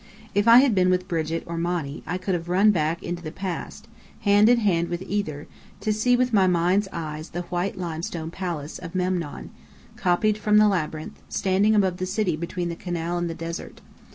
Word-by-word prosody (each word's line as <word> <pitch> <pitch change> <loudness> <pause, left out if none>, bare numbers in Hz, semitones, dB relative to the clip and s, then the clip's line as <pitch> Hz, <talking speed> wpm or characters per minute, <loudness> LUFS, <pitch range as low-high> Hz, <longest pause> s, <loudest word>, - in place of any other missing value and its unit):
If 205 +2 +2
I 235 +2 +9
had 270 -4 +3
been 185 -2 +3
with 185 0 +1
Brigit 165 -1 -2
or 170 0 -4
Monny, 170 -4 -2
I 180 - -1
could 185 +1 -2
have 170 -1 -3
run 195 +4 +5
back 165 -2 -1
into 175 0 -4
the 155 -2 -6
past, 185 -2 -6 0.3
hand 205 +1 +5
in 245 - +6
hand 175 -7 +1
with 175 +1 -3
either, 190 -8 -3 0.4
to 215 - +1
see 245 +4 +3
with 250 -1 +1
my 195 -3 +5
mind's 180 +3 +2
eyes 155 -1 -5
the 175 +1 -4
white 180 +2 -3
limestone 165 -1 -4
palace 170 -5 -5
of 180 0 -9
Memnon, 180 -4 -2 0.5
copied 210 +4 +1
from 210 0 +3
the 215 0 +7
Labyrinth, 155 -5 -2
standing 200 +3 +2
above 190 -3 +2
the 185 0 -3
city 185 -3 0
between 170 +2 -3
the 170 - -4
canal 175 0 -3
and 175 -1 -2
the 165 - -4
desert. 165 0 -6
180 Hz, 200 wpm, -24 LUFS, 165-200 Hz, 0.5 s, I